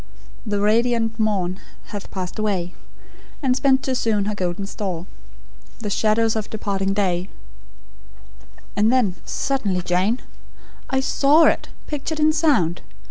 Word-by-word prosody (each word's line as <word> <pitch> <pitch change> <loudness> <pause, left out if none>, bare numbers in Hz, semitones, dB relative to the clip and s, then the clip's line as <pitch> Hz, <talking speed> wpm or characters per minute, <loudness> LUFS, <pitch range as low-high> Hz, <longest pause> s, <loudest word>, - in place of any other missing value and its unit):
"'The 205 -1 0
radiant 225 +2 +2
morn 195 -4 0 0.3
hath 205 -2 -6
passed 185 +2 -5
away, 190 -5 -1 0.7
And 255 -2 +3
spent 270 0 +3
too 265 - 0
soon 220 -5 +1
her 210 - -1
golden 185 0 -2
store; 185 -4 -4 0.7
The 210 -2 -4
shadows 220 +2 +2
of 215 -1 -3
departing 195 -2 -1
day 185 -2 0 0.7
'" - - -24
"And 210 +3 +3
then 220 -8 +2
suddenly, 205 -10 -1
Jane 185 +8 +1 0.7
I 265 -1 +1
SAW 290 +4 +4
it, - - +3 0.2
pictured 305 +1 -4
in 305 0 +4
sound! 275 - +2
210 Hz, 135 wpm, -22 LUFS, 185-245 Hz, 0.7 s, SAW